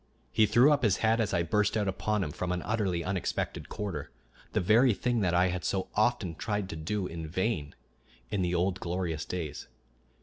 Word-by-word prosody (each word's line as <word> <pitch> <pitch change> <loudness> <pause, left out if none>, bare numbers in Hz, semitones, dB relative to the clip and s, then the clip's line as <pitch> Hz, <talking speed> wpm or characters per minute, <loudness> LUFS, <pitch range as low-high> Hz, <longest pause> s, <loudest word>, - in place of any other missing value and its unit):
He 110 -1 +4
threw 120 +7 +6
up 145 - +3
his 105 -6 +3
head 115 +1 +3
as 105 - 0
I 85 -2 +1
burst 105 +5 +1
out 105 -2 0
upon 100 +2 0
him 75 - -3
from 90 +4 -3
an 90 -1 -2
utterly 100 -6 0
unexpected 95 -1 -2
quarter 95 -9 -4 0.4
the - - +1
very 115 +5 +4
thing 120 +1 0
that 90 -4 +1
I 90 +1 +4
had 90 0 -3
so 95 -1 -1
often 105 -5 +1
tried 105 +3 -2
to 80 - -5
do, 90 +5 -2
in 80 -2 -5
vain, 85 -4 -2 0.6
in 100 - 0
the 90 0 0
old 90 +2 +1
glorious 85 -3 -2
days. 85 -5 -5
95 Hz, 200 wpm, -30 LUFS, 85-105 Hz, 0.6 s, threw